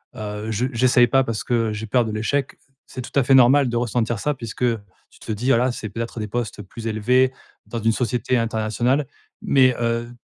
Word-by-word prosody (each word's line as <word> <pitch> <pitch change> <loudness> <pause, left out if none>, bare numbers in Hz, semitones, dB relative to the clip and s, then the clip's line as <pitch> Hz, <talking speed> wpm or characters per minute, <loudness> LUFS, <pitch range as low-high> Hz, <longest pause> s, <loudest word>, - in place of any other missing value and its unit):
«Heu, 105 0 -5
je 120 +5 0
j'essaye 120 0 +4
pas 135 +3 +3
parce 115 -2 -3
que, 120 - -3 0.2
heu, - - -3
j'ai 110 +1 -5
peur 120 +1 +2
de 110 - -4
l'échec», 130 +6 -2 0.3
c'est 125 - -8
tout 130 - -6
à - - +3
fait 135 - +3
normal 130 +2 +6
de 120 - -3
ressentir 120 -2 -1
ça 150 +5 0
puisque, 115 -1 -9
heu, 115 -3 +1 0.3
tu - - -22
te - - -6
dis: 115 +5 -3
«Voilà, 125 0 +3
c'est 110 -3 -6
peut-être 115 +2 -5
des 105 - -3
postes 110 -2 -4
plus 110 +4 -10
élevés, 125 +4 +2 0.3
dans 115 - -5
une 115 +1 +3
société 125 +1 0
internationale». 115 +4 0 0.3
Mais, 130 -3 +4
heu, 115 +1 -1
120 Hz, 215 wpm, -22 LUFS, 110-125 Hz, 0.3 s, normal